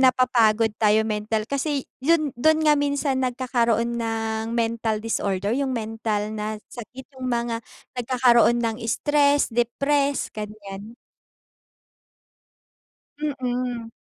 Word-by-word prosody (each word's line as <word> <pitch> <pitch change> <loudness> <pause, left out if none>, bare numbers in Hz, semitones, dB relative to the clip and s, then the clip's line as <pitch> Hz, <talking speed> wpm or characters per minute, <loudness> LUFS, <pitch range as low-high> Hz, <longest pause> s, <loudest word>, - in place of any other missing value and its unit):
napapagod 230 -4 +4
tayo 215 0 +4
mental. 215 0 -1
Kasi, 280 0 -1 0.2
yun 305 +1 +2
dun 315 +4 +4
nga 300 -1 +5
minsan 285 -2 0
nagkakaroon 235 -2 0
ng 225 0 -2
mental 225 -2 0
disorder, 200 -3 -1
yung 270 +1 0
mental 220 -1 -2
na 215 0 -3 0.2
sakit 250 +2 -10
yung 255 - -4
mga 235 -1 -1 0.4
nagkakaroon 240 -1 +4
ng 225 -1 -1
stress, 290 +4 +2
depress, 275 +4 +1
gan'yan. 210 0 -8 2.3
Mm. 250 -5 -2
235 Hz, 105 wpm, -24 LUFS, 220-265 Hz, 2.3 s, nga